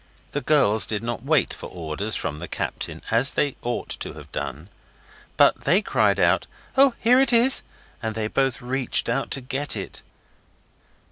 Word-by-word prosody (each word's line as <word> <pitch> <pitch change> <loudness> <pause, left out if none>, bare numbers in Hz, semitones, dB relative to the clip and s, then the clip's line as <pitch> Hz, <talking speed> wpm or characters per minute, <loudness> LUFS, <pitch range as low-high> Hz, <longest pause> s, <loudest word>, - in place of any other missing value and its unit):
The 145 - -3
girls 120 -9 +4
did 110 0 -3
not 120 -1 -3
wait 145 +1 +1
for - - -8
orders 90 +6 -3
from 75 -2 -3
the 90 - -6
captain, - - -5
as 120 +5 +4
they 145 -2 0
ought 120 0 -4
to - - -5
have - - -13
done; 80 +8 -6 0.7
but - - +3
they 180 +9 +3
cried - - +1
out, - - +2 0.3
'Oh, 270 -2 +5
here 245 +3 +4
it 270 -2 +3
is!' 240 +3 +5 0.4
and 110 -2 -3
then 110 -1 -3
both 135 -3 0
reached 130 -1 0
out 130 +4 -1
to 135 - -1
get 135 +3 -1
it. - - -7
125 Hz, 175 wpm, -23 LUFS, 110-145 Hz, 0.7 s, Oh